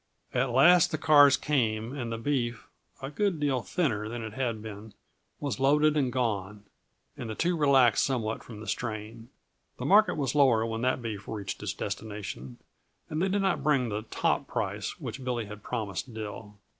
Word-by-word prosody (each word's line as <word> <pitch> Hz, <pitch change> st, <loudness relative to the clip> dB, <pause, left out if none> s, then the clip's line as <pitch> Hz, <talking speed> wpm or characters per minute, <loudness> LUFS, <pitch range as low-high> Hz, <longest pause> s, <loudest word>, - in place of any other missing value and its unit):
At 125 Hz, +1 st, +1 dB
last 160 Hz, +8 st, +6 dB
the 155 Hz, -, -2 dB
cars 145 Hz, -3 st, +6 dB
came 115 Hz, -4 st, 0 dB
and 120 Hz, -4 st, -4 dB
the 115 Hz, -, -2 dB
beef, 120 Hz, -2 st, -2 dB, 0.4 s
a 135 Hz, -, -4 dB
good 190 Hz, +1 st, 0 dB
deal 140 Hz, -4 st, +1 dB
thinner 110 Hz, -9 st, -1 dB
than 120 Hz, 0 st, -5 dB
it 110 Hz, -2 st, -6 dB
had 120 Hz, -3 st, -2 dB
been, 110 Hz, 0 st, -9 dB, 0.4 s
was 140 Hz, -2 st, -3 dB
loaded 150 Hz, +3 st, +4 dB
and 135 Hz, -4 st, +1 dB
gone, 105 Hz, -5 st, -2 dB, 0.5 s
and 120 Hz, -, -6 dB
the 110 Hz, -, -4 dB
two 175 Hz, +7 st, +1 dB
relaxed 135 Hz, -6 st, +4 dB
somewhat 115 Hz, -5 st, -1 dB
from 110 Hz, -3 st, -10 dB
the 110 Hz, -, -9 dB
strain. 115 Hz, 0 st, -5 dB, 0.5 s
The -, -, -5 dB
market 210 Hz, +3 st, +5 dB
was 135 Hz, -5 st, -1 dB
lower 130 Hz, -6 st, +4 dB
when 115 Hz, 0 st, -3 dB
that 130 Hz, 0 st, 0 dB
beef 105 Hz, -4 st, -5 dB
reached 105 Hz, -3 st, -5 dB
its -, -, -3 dB
destination, 100 Hz, -, -6 dB, 0.5 s
and 155 Hz, +1 st, -1 dB
they 190 Hz, -, +2 dB
did 200 Hz, +1 st, +1 dB
not 190 Hz, -2 st, +1 dB
bring 135 Hz, -5 st, +2 dB
the 105 Hz, 0 st, -2 dB
"top" -, -, 0 dB
price -, -, -3 dB
which 135 Hz, -, -6 dB
Billy 120 Hz, -3 st, -2 dB
had 105 Hz, 0 st, -9 dB
promised 110 Hz, 0 st, -4 dB
Dill. 105 Hz, -1 st, -7 dB
120 Hz, 180 wpm, -28 LUFS, 110-140 Hz, 0.5 s, last